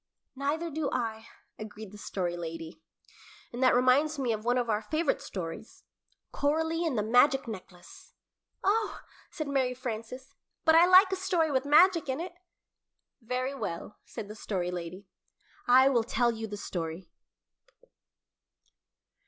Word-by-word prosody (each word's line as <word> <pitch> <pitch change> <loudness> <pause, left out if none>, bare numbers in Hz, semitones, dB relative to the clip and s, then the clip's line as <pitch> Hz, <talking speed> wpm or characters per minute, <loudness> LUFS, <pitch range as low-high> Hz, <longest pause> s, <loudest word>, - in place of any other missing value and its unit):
"Neither 305 +5 -2
do 300 -1 -2
I," 225 -2 -3 0.3
agreed 215 -1 -8
the 210 - -11
Story 180 -4 -3
Lady; 165 -1 -7 0.7
"and 240 - -5
that 255 - +5
reminds 265 +5 +3
me 250 -4 0
of 215 -1 -5
one 245 +2 +1
of 245 -1 0
our 215 -1 0
favorite 310 +7 -1
stories 175 +3 -7 0.5
Coralie 320 +3 0
and 275 -7 -1
the 210 - +1
Magic 250 +4 +4
Necklace." 215 - -11 0.5
"Oh," 430 +3 0 0.3
said 310 -3 -5
Mary 260 -3 0
Frances, 250 +1 -6 0.3
"but 320 - +6
I 335 +2 +7
like 375 +1 +7
a - - +1
story 360 -4 0
with 265 0 0
magic 330 +1 +5
in 260 +2 -1
it." 350 +1 -5 0.9
"Very 255 +3 -2
well," 205 -5 -6
said 205 - -8
the 210 - -8
Story 185 -4 -3
Lady, 180 +2 -6 0.6
"I 255 +2 +7
will 245 -4 +3
tell 240 +1 +1
you 225 -1 -5
the 205 -1 -6
story." 170 -2 -5
250 Hz, 145 wpm, -29 LUFS, 210-305 Hz, 0.9 s, I